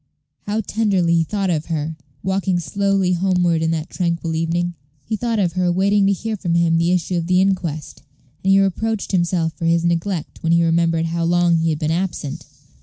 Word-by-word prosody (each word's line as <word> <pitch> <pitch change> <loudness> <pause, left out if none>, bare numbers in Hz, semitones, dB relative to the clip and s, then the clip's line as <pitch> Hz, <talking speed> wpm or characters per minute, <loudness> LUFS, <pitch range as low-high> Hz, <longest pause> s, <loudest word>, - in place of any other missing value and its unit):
How 210 +2 0
tenderly 195 -6 +1
he 165 - +3
thought 195 +2 -1
of 155 -2 -2
her, 160 -1 -3 0.3
walking 190 -1 0
slowly 195 0 0
homeward 180 -2 +1
in 160 - +1
that 160 0 -3
tranquil 170 -2 -2
evening? 170 +2 -1 0.3
He 220 - -2
thought 230 +1 -1
of 180 -5 +1
her 180 -1 +1
waiting 195 +2 +2
to - - +3
hear 215 +3 -2
from 175 -4 -2
him 165 -1 +3
the 170 +1 +2
issue 180 0 0
of 170 -1 -2
the 180 0 +3
inquest, 180 -6 -1 0.4
and 190 - +1
he 195 - +6
reproached 205 +3 -1
himself 170 -3 0
for 165 - -5
his 165 0 +2
neglect 170 0 -2
when 165 0 +1
he 170 0 +4
remembered 165 0 +2
how 170 +1 -2
long 175 0 +3
he 165 0 +1
had 155 - 0
been 155 0 -1
absent. 160 -5 -3
175 Hz, 200 wpm, -20 LUFS, 165-190 Hz, 0.4 s, he